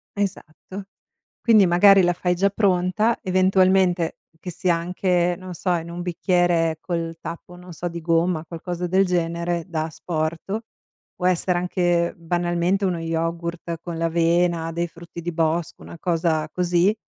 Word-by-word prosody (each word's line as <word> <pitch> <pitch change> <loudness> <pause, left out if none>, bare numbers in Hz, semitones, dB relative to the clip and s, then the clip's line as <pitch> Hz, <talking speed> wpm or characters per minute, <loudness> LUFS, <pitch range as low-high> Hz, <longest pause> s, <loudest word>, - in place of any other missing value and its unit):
Esatto. 195 0 -5 0.6
Quindi, 215 -4 +6
magari 195 +3 +6
la 175 0 +3
fai 180 0 0
già 200 +3 +2
pronta, 200 +3 +1
eventualmente 185 -2 +2 0.2
che 180 - -6
sia 175 -1 +1
anche, 180 0 0
non 185 -1 -8
so, 180 +2 -2
in 165 0 -4
un 175 +1 -6
bicchiere 175 -2 +1
col 165 -2 -3
tappo, 175 +1 -8
non 180 -1 -12
so, 175 +2 -4
di 170 0 -7
gomma, 165 0 +1
qualcosa 175 +2 -5
del 190 +2 +3
genere, 170 -1 -1
da 160 -3 -2
asporto, 165 +6 -3 0.5
può 180 - -4
essere 180 0 +1
anche 175 -1 +1
banalmente 175 +3 0
uno 175 -3 0
yogurt 165 0 -3
con 170 -2 -6
l'avena, 165 0 +1
dei 170 +1 -2
frutti 170 +1 -11
di 175 +1 -3
bosco, 165 0 -1
una 170 - -10
cosa 160 -3 0
così, 180 +3 +2
175 Hz, 145 wpm, -23 LUFS, 165-185 Hz, 0.6 s, Quindi